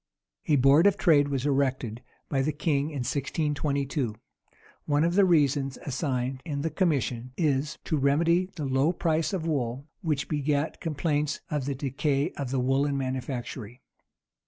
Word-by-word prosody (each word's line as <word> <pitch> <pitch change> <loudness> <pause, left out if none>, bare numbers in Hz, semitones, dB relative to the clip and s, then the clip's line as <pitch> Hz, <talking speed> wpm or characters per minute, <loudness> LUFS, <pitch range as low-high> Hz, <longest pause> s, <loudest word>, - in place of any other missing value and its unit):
A 150 - +4
board 140 +7 +6
of 200 0 +3
trade 150 -6 +4
was 135 -2 -2
erected 130 -5 0 0.3
by 135 - 0
the 150 +3 +1
king 145 -2 0
in 140 -5 -3
1622.[*] 140 -2 -1 0.7
One 145 +1 +3
of 170 +1 +2
the 200 +1 +5
reasons 140 -5 +2
assigned 130 -2 -2
in 145 -4 -3
the 165 - -1
commission 130 -8 0
is, 150 -2 0
to 155 - 0
remedy 170 +6 +2
the 150 - -3
low 135 +5 +2
price 165 -1 0
of 185 -5 -2
wool, 135 -4 -2 0.2
which 150 -6 -1
begat 145 0 -1
complaints 150 -2 -1
of 145 -3 -1
the 140 0 -2
decay 140 +3 0
of 140 -3 -5
the 135 0 0
woollen 135 +3 +1
manufactory. 130 -2 -4
140 Hz, 155 wpm, -27 LUFS, 135-155 Hz, 0.7 s, board